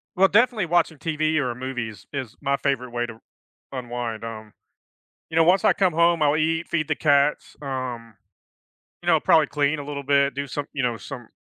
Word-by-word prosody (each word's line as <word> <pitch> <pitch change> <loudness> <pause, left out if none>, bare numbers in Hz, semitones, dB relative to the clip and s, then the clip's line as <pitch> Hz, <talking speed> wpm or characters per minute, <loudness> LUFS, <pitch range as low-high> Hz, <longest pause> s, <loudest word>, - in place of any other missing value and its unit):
Well, 195 +1 +5
definitely 220 0 +3
watching 170 -2 +1
TV 155 0 0
or 125 -5 -1
movies 125 -4 -5
is 130 -4 -5
my 140 -1 +1
favorite 125 -3 -1
way 120 0 -1
to 115 -1 -10 0.5
unwind, 120 -3 -5
um, 110 -2 -8 0.8
you 160 - -6
know, 165 - +6
once 180 +3 +4
I - - +6
come 185 -4 +2
home, 170 0 +3
I'll 150 +1 +3
eat, 160 +2 0
feed 155 -3 -1
the 155 - +1
cats, 145 -1 +2
um, 125 -4 -5 0.9
you - - -5
know, - - +5
probably 155 -3 +4
clean 145 0 0
a - - -6
little 140 -1 -6
bit, 140 0 +3
do 140 0 -3
some 145 +2 -4
you 135 - -2
know, 120 -2 0
some 125 -2 -9
140 Hz, 195 wpm, -24 LUFS, 125-160 Hz, 0.9 s, know